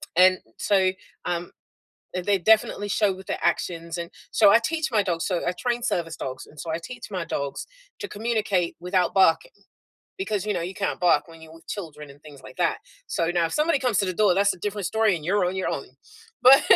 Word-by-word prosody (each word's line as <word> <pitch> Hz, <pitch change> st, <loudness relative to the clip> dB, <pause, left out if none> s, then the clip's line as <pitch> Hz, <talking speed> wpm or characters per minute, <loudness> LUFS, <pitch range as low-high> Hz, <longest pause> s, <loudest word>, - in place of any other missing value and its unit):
And 185 Hz, +1 st, +6 dB, 0.2 s
so, 190 Hz, -2 st, +3 dB, 0.3 s
um, 175 Hz, 0 st, -3 dB, 0.6 s
th 180 Hz, -1 st, -3 dB
they 200 Hz, -1 st, +3 dB
definitely 205 Hz, +1 st, +2 dB
show 205 Hz, -1 st, +2 dB
with 190 Hz, 0 st, -12 dB
their -, -, -2 dB
actions, 170 Hz, -1 st, -1 dB
and 170 Hz, 0 st, -5 dB, 0.2 s
so, 210 Hz, -3 st, +6 dB
I 230 Hz, -, +7 dB
teach 315 Hz, +4 st, 0 dB
my 210 Hz, -3 st, +3 dB
dogs 170 Hz, -3 st, -1 dB
so, 180 Hz, -3 st, -1 dB
I 180 Hz, -, +1 dB
train 240 Hz, +3 st, -1 dB
service 165 Hz, -8 st, -1 dB
dogs, 130 Hz, 0 st, -6 dB
and 150 Hz, -, -15 dB
so 165 Hz, -, -4 dB
I 160 Hz, -, 0 dB
teach 245 Hz, -2 st, -8 dB
my 180 Hz, -3 st, -2 dB
dogs 140 Hz, -4 st, -3 dB, 0.3 s
to 410 Hz, -, -4 dB
communicate 210 Hz, -, -1 dB
without 180 Hz, 0 st, 0 dB
barking 165 Hz, -4 st, +4 dB, 0.7 s
because, 210 Hz, -, -2 dB
you 210 Hz, -, +1 dB
know, 180 Hz, -, -2 dB
you 180 Hz, +3 st, -4 dB
can't 200 Hz, 0 st, -2 dB
bark 170 Hz, -4 st, +3 dB
when 165 Hz, 0 st, -14 dB
you're 160 Hz, 0 st, -13 dB
with 165 Hz, -, -17 dB
children 155 Hz, -7 st, -7 dB
and 140 Hz, +1 st, -16 dB
things 145 Hz, -3 st, -13 dB
like 130 Hz, -, -12 dB
that. 175 Hz, -2 st, +1 dB, 0.3 s
So, 165 Hz, -, -1 dB
now 175 Hz, -1 st, +2 dB
if -, -, -7 dB
somebody 305 Hz, 0 st, +2 dB
comes 250 Hz, -7 st, +1 dB
to 195 Hz, -, +2 dB
the 185 Hz, -, -2 dB
door, 200 Hz, -3 st, +4 dB
that's 200 Hz, +1 st, +3 dB
a -, -, -16 dB
different 205 Hz, -1 st, -3 dB
story, 220 Hz, -2 st, +2 dB
and 155 Hz, -, -9 dB
you're 195 Hz, +2 st, +2 dB
on 180 Hz, +2 st, -1 dB
your 190 Hz, -, -1 dB
own, 140 Hz, -, -3 dB, 0.6 s
but 265 Hz, +2 st, +9 dB
185 Hz, 225 wpm, -25 LUFS, 170-210 Hz, 0.7 s, but